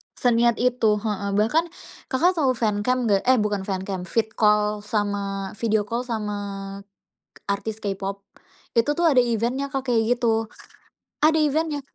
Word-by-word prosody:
Seniat 235 -1 +3
itu, 245 -4 +3
heeh. 205 -2 -3
Bahkan 235 +11 +2 0.4
Kakak 345 +7 +2
tahu 265 -4 +2
fancam 225 +3 0
nggak? 200 -3 +3
Eh, 260 0 +6
bukan 205 -2 -2
fancam, 190 -1 -3
vid-call 210 -1 +1
sama 200 -2 -2
video 220 -2 +1
call 235 +4 -3
sama 210 -3 -3 1.0
k - - -14
artis 200 +2 -3
K-pop 200 -1 -4 0.5
itu 230 +5 +3
tuh, 340 +3 +1
ada 290 - +2
event-nya, 240 +4 -1
Kak, 265 -2 -3
kayak 235 0 +2
gitu. 225 -2 +1 0.8
Ada 315 +1 +5
event-nya. 305 0 0
225 Hz, 140 wpm, -24 LUFS, 205-250 Hz, 1.0 s, Eh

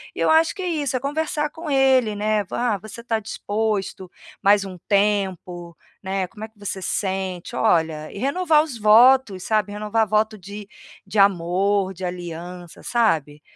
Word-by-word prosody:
e - - -8
eu - - +2
acho 320 +1 +4
que 385 - -6
é - - -2
isso, 290 -5 -1
é - - -3
conversar 300 +1 -1
com 320 -1 -8
ele, 260 -5 +3
né, 210 0 0
"ah, 240 -4 0
você 220 +2 -10
tá 225 -2 -1
disposto 205 -3 -3 0.3
mais 200 0 +5
um 185 -2 -8
tempo, 190 -4 0 0.3
né, 190 -1 -2
como 210 +4 -11
é - - -13
que 220 - -36
você 195 -1 -5
sente?". 190 -2 -3
Olha, 160 -2 +1
e - - -9
renovar 310 +3 +2
os 290 -7 -7
votos, 220 -2 +5
sabe, 210 -2 0
renovar 215 +1 0
voto 215 +1 +1
de 200 +2 -9 0.4
de 195 +2 -6
amor, 195 +1 +2
de 185 0 -6
aliança, 175 0 -7
sabe. 160 - 0
205 Hz, 170 wpm, -22 LUFS, 185-235 Hz, 0.4 s, mais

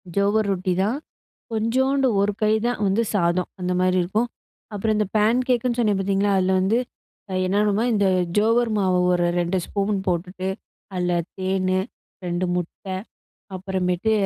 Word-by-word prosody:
ஜோவர் 200 +2 +2
ரொட்டிதான். 190 +5 0 0.6
கொஞ்சோண்டு 260 +5 +2
ஒரு 200 +1 +2
கை 215 0 +3
தான் 245 - -1
வந்து 200 +4 +2
சாதம், 175 -1 +1
அந்த 180 0 -2
மாரி 185 0 +2
இருக்கும். 210 +7 0 0.5
அப்புறம் 215 +2 0
இந்த 210 -2 +1
பேன்கேக்குன்னு 240 +2 +2
சொன்னேன் 210 -4 +2
பார்த்தீங்களா, 195 +1 +1
அதில 190 0 +2
வந்து 200 +5 +2 0.7
என்னாணும்னா 205 +2 +2
இந்த 205 -2 +2 0.3
ஜோவர் 230 +2 +3
மாவு 185 -2 +2
ஒரு 175 -1 +2
2 175 +2 0
ஸ்பூன் 200 0 -1
போட்டுட்டு, 180 +1 -2 0.5
அதில 180 -1 0 0.3
தேனு, 185 0 0 0.5
2 175 +1 -1
முட்டை 180 +2 -4 0.6
அப்புறமேட்டு 185 +1 -1
195 Hz, 130 wpm, -23 LUFS, 185-220 Hz, 0.7 s, கை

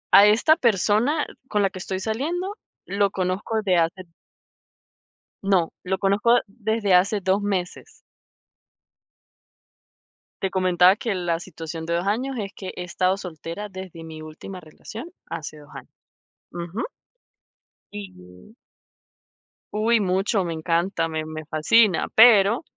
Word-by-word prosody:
A 200 +1 +9
esta 230 +9 +5
persona 235 - +2 0.2
con 210 -1 +1
la 195 - +1
que 185 - -8
estoy 190 0 -4
saliendo 330 - -2 0.3
lo 200 0 +1
conozco 190 +4 -2
de 185 -3 +2
hace 170 +3 0 1.4
No, 185 -4 +2
lo 190 +1 -1
conozco 205 +5 +3
desde 215 -1 -1
hace 200 +3 +3
2 190 +2 +1
meses. 190 -3 -3 2.5
Te 190 - 0
comentaba 185 0 +4
que 220 -3 -2
la 175 -2 -1
situación 165 -2 -7
de 170 - -2
2 170 +2 0
años 250 +7 -1
es 200 -3 -4
que 190 - -7
he 180 - -5
estado 185 +1 0
soltera 180 +2 -7
desde 185 -3 -9
mi 160 -1 -9
última 155 +5 -9
relación 215 - -10 0.2
hace 155 0 -6
2 145 -1 -16
años. - - -11 0.6
Ujú. 175 +4 -5 1.1
Y 90 - -11 1.2
Uy, 225 +2 +3
mucho, 195 +1 +1
me 170 -2 -3
encanta, 165 +1 0
me 160 -1 -3
me 155 0 -7
fascina, 170 +5 +3
pero 225 +2 +6
190 Hz, 130 wpm, -24 LUFS, 170-210 Hz, 2.5 s, A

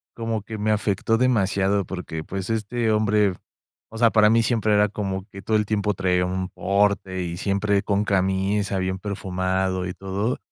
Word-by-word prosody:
como 115 -3 -3
que 110 +1 -7
me 105 +1 0
afectó 110 +2 +1
demasiado 100 -5 +2
porque, 85 -4 -6
pues, 95 +1 -5
este 115 +1 -1
hombre, 105 -2 +2 0.6
o 115 - -9
sea, 115 -1 +4
para 105 -1 +5
mí 115 0 +4
siempre 110 -2 +1
era 105 0 +4
como 95 -2 -4
que 100 0 -10
todo 110 +1 +1
el 105 - 0
tiempo 105 0 0
traía 90 -1 +1
un 95 0 -2
porte 100 -2 0
y 85 -1 -4
siempre 100 +1 +1
con 100 0 0
camisa, 95 +1 0
bien 95 0 -1
perfumado 95 -2 -2
y 90 - -4
todo. 100 +6 -2
100 Hz, 175 wpm, -23 LUFS, 95-105 Hz, 0.6 s, para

